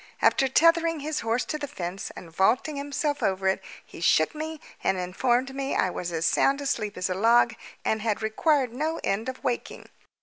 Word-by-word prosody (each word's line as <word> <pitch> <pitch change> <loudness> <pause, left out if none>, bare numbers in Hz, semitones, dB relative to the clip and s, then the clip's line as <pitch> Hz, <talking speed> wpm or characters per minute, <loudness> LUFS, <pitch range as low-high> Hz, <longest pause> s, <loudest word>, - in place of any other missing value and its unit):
After 270 - +4
tethering 330 +2 +3
his 305 +1 -2
horse 230 +2 0
to 305 - -3
the 290 - -4
fence 185 -8 -5
and 165 - -10
vaulting 240 - +2
himself 285 +1 -2
over 190 0 0
it, 190 0 +1 0.2
he - - -12
shook 155 -2 +3
me 315 0 -5 0.2
and 190 - +1
informed 240 +9 0
me 275 0 -2
I 185 - +2
was 175 -1 -4
as 165 0 -1
sound 275 +1 +3
asleep 230 -7 -2
as 180 - -1
a 185 - -1
log, 230 +4 +4 0.3
and 220 0 +1
had 220 -1 -1
required 255 +3 +1
no 310 +5 -2
end 215 +6 -1
of 260 - -8
waking. 245 -1 -3
245 Hz, 195 wpm, -26 LUFS, 195-290 Hz, 0.3 s, After